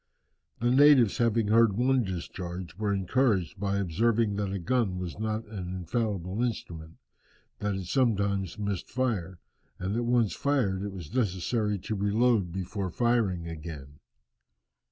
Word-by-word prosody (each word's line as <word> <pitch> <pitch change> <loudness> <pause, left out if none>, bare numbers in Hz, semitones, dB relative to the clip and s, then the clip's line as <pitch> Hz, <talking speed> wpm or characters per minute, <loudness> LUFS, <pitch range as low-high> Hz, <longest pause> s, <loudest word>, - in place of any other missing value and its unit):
The 120 +1 +2
natives 135 -5 +6
having 115 -2 +2
heard 110 -2 +4
one 130 +1 +3
discharge, 90 -2 -5
were 105 +1 -1
encouraged 100 -1 +1
by 100 0 0
observing 105 +4 +1
that 100 -2 -1
a 100 - -2
gun 100 0 0
was 90 +1 -5
not 110 +1 -2
an 100 -4 -6
infallible 95 +1 -2
instrument, 85 -9 -4 0.6
that 105 -1 -1
it 95 -1 -4
sometimes 100 - 0
missed 100 -3 -3
fire, 105 -9 -1 0.4
and 95 +2 -3
that 120 - 0
once 120 -3 +2
fired 125 -10 0
it 100 0 -4
was 90 -5 -9
necessary 105 -1 0
to 105 - -4
reload 105 -1 +2
before 95 +1 -3
firing 105 -5 +1
again. 75 -3 -8
100 Hz, 140 wpm, -28 LUFS, 90-115 Hz, 0.6 s, natives